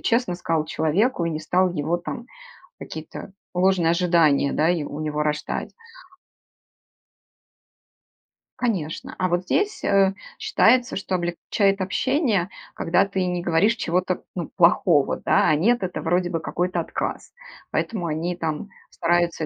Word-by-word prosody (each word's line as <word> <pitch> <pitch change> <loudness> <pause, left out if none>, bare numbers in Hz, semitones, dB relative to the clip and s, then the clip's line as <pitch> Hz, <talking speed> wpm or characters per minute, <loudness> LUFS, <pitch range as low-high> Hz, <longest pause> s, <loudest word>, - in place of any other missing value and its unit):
честно 230 -6 +1
сказал 165 -3 -1
человеку 170 - +1
и 170 - -1
не 155 -1 -3
стал 180 +4 +2
его 165 +1 -1
там 235 +7 -6 0.5
какие-то - - -8 0.2
ложные 180 -2 +3
ожидания, 170 -5 +3
да, 155 +3 +2
и 170 -4 0
у 145 +1 -6
него 150 -1 -1
рождать. 150 0 -2 2.9
Конечно. 185 -11 -3
А 185 - 0
вот 175 +1 0
здесь, 410 - -1
э, 195 -1 +3 0.3
считается, 245 +2 +3
что 190 -1 -2
облегчает 190 +3 0
общение, 210 - +1 0.3
когда 165 +3 +2
ты 195 -2 -2
не 180 -1 -1
говоришь 175 +6 +2
чего-то, 185 -2 -1
ну, 175 -3 -4
плохого, 170 -4 +4
да, - - +2
а 155 - +4
"нет"- 230 +10 +2
это 185 - -3
вроде 180 0 +1
бы 165 -2 -2
какой-то 180 +2 -2
отказ. 165 - -4 0.4
Поэтому 205 -6 -2
они 165 +2 -2
там 165 +3 -4 0.2
стараются 170 -1 +1
175 Hz, 135 wpm, -23 LUFS, 165-195 Hz, 2.9 s, плохого